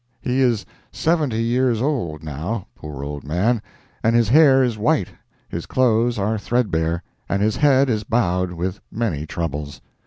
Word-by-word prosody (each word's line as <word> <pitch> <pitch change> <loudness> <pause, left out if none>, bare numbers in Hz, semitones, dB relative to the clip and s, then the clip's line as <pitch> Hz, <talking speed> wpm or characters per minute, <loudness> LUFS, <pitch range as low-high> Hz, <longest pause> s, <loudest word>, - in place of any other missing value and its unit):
He 125 +3 0
is 120 -5 +2 0.3
seventy 150 -9 0
years 120 0 +1
old, 115 - -2
now, 80 +8 -4
poor 75 -3 -8
old 70 0 -5
man, 100 +10 +1 0.4
and 115 +1 +3
his 115 -3 +3
hair 135 -1 +6
is 120 -3 0
white, 105 - +1 0.4
his - - -6
clothes 120 -2 +2
are 105 +2 0
threadbare, 85 -8 0 0.3
and 100 - +1
his 110 -1 +1
head 140 -2 +4
is 110 -4 0
bowed 90 -5 0
with 90 +3 -4
many 90 -10 -2
troubles. 75 -3 -4
110 Hz, 155 wpm, -21 LUFS, 85-125 Hz, 0.4 s, hair